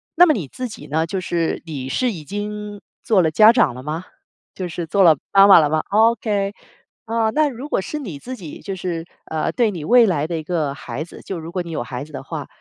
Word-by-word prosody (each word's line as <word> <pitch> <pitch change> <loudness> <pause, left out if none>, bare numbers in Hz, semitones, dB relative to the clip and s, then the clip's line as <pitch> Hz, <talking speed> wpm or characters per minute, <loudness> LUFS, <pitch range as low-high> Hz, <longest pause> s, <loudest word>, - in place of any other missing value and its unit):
那 355 +2 +7
么 310 - +5
你 170 - -4
自 255 - -5
己 - - -10
呢？ 160 +3 -1
就 190 +2 -2
是 170 -2 -2
你 140 -5 -5
是 250 - 0
已 165 -6 -8
经 205 +3 -5 0.2
做 195 -6 +3
了 160 - +1
家 215 +6 +7
长 140 - +3
了 125 - -8
吗？ 155 +5 -4 0.5
就 185 - -4
是 170 0 -5
做 195 +5 +1
了 165 -5 +7
妈 195 0 +7
妈 195 - +9
了 150 - +3
吗 155 0 +1
？OK。 210 -2 +2 0.5
啊， 225 -1 0
那 305 +3 +2
如 255 +3 -7
果 195 - 0
是 300 +9 -5
你 190 - -6
自 255 - -8
己 165 -7 -9
就 195 -1 -5
是， 170 -2 -4 0.2
呃， 160 -1 -2
对 230 -4 +1
你 165 -5 -6
未 240 +5 +6
来 160 -8 0
的 165 0 -3
一 155 - -5
个 155 -4 -1
孩 130 +2 -6
子， 170 - -12
就 190 - -5
如 165 +1 -7
果 180 0 -2
你 170 - -8
有 155 - -3
孩 125 +2 -6
子 155 - -17
的 - - -6
话， - - -6
180 Hz, 270 characters per minute, -21 LUFS, 155-215 Hz, 0.5 s, 妈